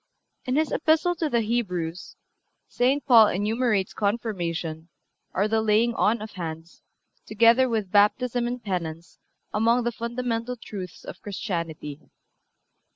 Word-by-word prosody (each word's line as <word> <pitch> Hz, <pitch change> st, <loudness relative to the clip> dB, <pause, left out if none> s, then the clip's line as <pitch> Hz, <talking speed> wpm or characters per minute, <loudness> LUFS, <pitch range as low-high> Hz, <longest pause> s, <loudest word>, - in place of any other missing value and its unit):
(355) -, -, -23 dB
In 265 Hz, +4 st, +2 dB
his 315 Hz, -, 0 dB
Epistle 320 Hz, +3 st, +2 dB
to 325 Hz, -2 st, -2 dB
the 235 Hz, -4 st, +2 dB
Hebrews 185 Hz, -7 st, -3 dB, 0.5 s
St. 265 Hz, +4 st, +1 dB
Paul 230 Hz, -6 st, +8 dB
enumerates 210 Hz, +1 st, 0 dB
Confirmation, 175 Hz, -7 st, -2 dB, 0.4 s
or 200 Hz, +3 st, +1 dB
the 220 Hz, +1 st, +1 dB
laying 220 Hz, +2 st, +3 dB
on 220 Hz, 0 st, +1 dB
of 215 Hz, -, -8 dB
hands, 165 Hz, -2 st, -7 dB, 0.5 s
together 230 Hz, +4 st, +4 dB
with 215 Hz, -5 st, -2 dB
Baptism 240 Hz, +4 st, +3 dB
and 245 Hz, 0 st, -4 dB
Penance, 170 Hz, -4 st, -5 dB, 0.3 s
among 230 Hz, +3 st, +3 dB
the 240 Hz, -, 0 dB
fundamental 235 Hz, 0 st, -3 dB
truths 195 Hz, -6 st, -8 dB
of -, -, -9 dB
Christianity. 165 Hz, -7 st, -5 dB
220 Hz, 130 wpm, -25 LUFS, 185-240 Hz, 0.5 s, Paul